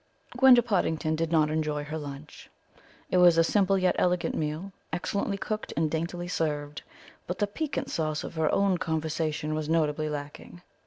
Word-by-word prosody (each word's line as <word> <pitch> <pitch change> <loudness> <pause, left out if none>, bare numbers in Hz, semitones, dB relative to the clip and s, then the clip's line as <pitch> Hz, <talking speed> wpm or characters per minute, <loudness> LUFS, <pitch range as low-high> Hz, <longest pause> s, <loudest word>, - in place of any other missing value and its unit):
Gwenda 255 -1 +7
Pottingdon 160 -7 0
did 165 0 -2
not 155 -2 +3
enjoy 150 -1 -1
her 150 +2 -5
lunch. 145 0 -9 0.6
It 185 - +3
was 175 -2 +6
a 165 - +6
simple 195 +2 +2
yet 185 -1 +2
elegant 180 -1 +1
meal, 155 +5 -3 0.2
excellently 200 +4 -2
cooked 215 +2 -4
and 155 -1 +1
daintily 170 +2 -3
served, 150 -4 -2 0.5
but 180 - -3
the 205 - +2
piquant 270 +5 -4
sauce 155 -1 -1
of - - -7
her 160 -2 +1
own 195 -3 +2
conversation 155 -2 -2
was 155 0 -3
notably 155 -1 +1
lacking. 150 +4 -7
160 Hz, 165 wpm, -28 LUFS, 155-185 Hz, 0.6 s, Gwenda